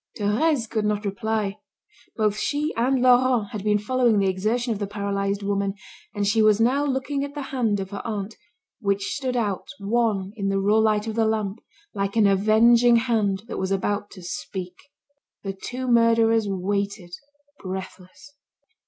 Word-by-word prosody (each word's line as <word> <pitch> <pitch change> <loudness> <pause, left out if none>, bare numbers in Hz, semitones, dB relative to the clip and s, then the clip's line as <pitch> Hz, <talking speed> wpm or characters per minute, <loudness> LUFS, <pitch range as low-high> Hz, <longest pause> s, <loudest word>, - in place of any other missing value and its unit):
Thérèse 230 +5 +1
could 215 -1 -2
not 210 0 -1
reply. 210 0 -2 0.6
Both 210 -2 +1
she 295 +2 -1
and 255 +2 +1
Laurent 250 -4 +4
had 210 -3 -5
been 210 0 +3
following 240 +1 +2
the 195 -1 +2
exertion 225 +6 -1
of 205 - -6
the 205 - -2
paralysed 200 0 -2
woman, 200 0 -1 0.4
and 205 -1 0
she 210 +2 +2
was 215 -1 +4
now 255 +5 +2
looking 275 0 -1
at 285 +1 -6
the 290 - -4
hand 225 -6 +1
of 190 0 -5
her 200 - -5
aunt, 215 -1 -4 0.4
which 200 -2 -1
stood 260 -3 -3
out 205 -5 -2
wan 205 -2 0
in 200 -3 -3
the 195 - 0
raw 205 +3 +3
light 215 -1 +2
of 220 - -3
the 225 0 +1
lamp, 215 -2 -1 0.3
like 200 +1 -2
an 220 -2 +4
avenging 225 +4 +5
hand 215 -5 +1
that - - -5
was 190 0 -1
about 205 +1 -1
to 185 - -12
speak. 180 +1 -6 0.7
The 195 -1 -3
two 250 +6 -6
murderers 230 -2 +4
waited, 200 -1 -3 0.5
breathless. 185 +6 -8
210 Hz, 170 wpm, -24 LUFS, 200-235 Hz, 0.7 s, avenging